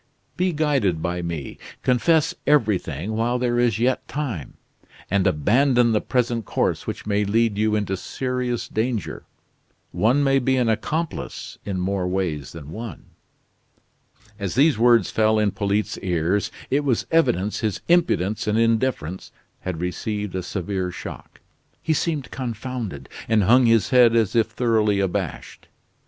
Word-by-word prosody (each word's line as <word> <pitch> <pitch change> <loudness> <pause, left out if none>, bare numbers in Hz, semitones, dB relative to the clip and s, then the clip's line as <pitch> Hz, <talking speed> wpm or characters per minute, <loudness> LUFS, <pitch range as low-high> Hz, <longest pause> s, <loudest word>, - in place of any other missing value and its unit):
Be 185 0 +1
guided 140 - +1
by 90 0 -2
me; 85 -4 -5 0.2
confess 150 +5 +3
everything, 105 - +1
while 120 +2 +1
there 120 -1 0
is 120 -4 +2
yet 125 +3 0
time; 125 - -4 0.6
and 100 0 +2
abandon 120 - +3
the 105 - +2
present 120 -2 0
course - - -1
which - - -5
may 105 0 +1
lead 110 +1 +1
you 105 +1 +1
into 100 -2 -1
serious 125 +2 -3
danger. 110 -4 -3 0.7
One 125 +7 +2
may 135 -1 +3
be 130 +1 +1
an 120 -3 +2
accomplice 155 +9 -3
in 95 -2 -3
more 95 0 -1
ways 90 -7 -2
than 75 -3 -10
one." 110 -4 -8 1.3
As 100 -2 -3
these 145 +2 +4
words 115 -2 +4
fell 110 0 +3
on 105 -1 +2
Polyte's 100 +1 -1
ears, 90 +2 0 0.2
it 145 +2 +2
was 130 -5 0
evident 105 - +2
his 105 -4 -2
impudence 135 - +2
and 105 +1 +1
indifference 115 - 0 0.3
had 90 -3 -5
received 105 +3 -3
a 95 - -2
severe 95 0 -3
shock. 90 - -9 0.4
He 160 - 0
seemed 155 -3 -2
confounded, 115 - -5 0.2
and 110 -2 +3
hung 120 +5 +5
his 115 -3 +3
head 120 -2 +6
as 110 -2 +2
if 115 -2 +3
thoroughly 110 -3 +1
abashed. 95 -3 -3
110 Hz, 145 wpm, -23 LUFS, 95-125 Hz, 1.3 s, head